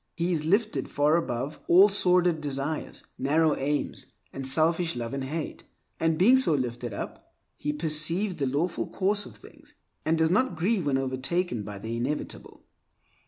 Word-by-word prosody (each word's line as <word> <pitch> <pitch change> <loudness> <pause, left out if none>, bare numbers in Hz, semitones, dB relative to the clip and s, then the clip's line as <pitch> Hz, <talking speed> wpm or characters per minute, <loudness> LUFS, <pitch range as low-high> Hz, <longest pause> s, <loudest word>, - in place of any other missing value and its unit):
He 175 +1 -1
is 155 -2 -1
lifted 210 +6 +1
far 145 +2 +2
above 140 -2 -2
all 190 +4 +8
sordid 180 -4 +2
desires, 145 +1 -4 0.2
narrow 155 +3 +2
aims, 140 -1 -2 0.3
and 135 -1 -4
selfish 165 +4 +2
love 120 0 -4
and 135 -1 -3
hate; 155 +3 -5 0.4
and 160 -1 +1
being 230 +10 +6
so 260 -12 +3
lifted 120 -2 -3
up 100 - -8 0.2
he 150 - -2
perceives 165 +5 0
the 140 -3 0
lawful 150 +7 -1
course 200 +2 0
of - - -13
things, - - -16 0.3
and 160 +1 +1
does 160 0 +2
not 210 0 +2
grieve 180 0 0
when 135 -2 +2
overtaken 135 - -1
by 105 0 -7
the 110 +3 -5
inevitable. 130 +6 -4
155 Hz, 165 wpm, -27 LUFS, 135-175 Hz, 0.4 s, all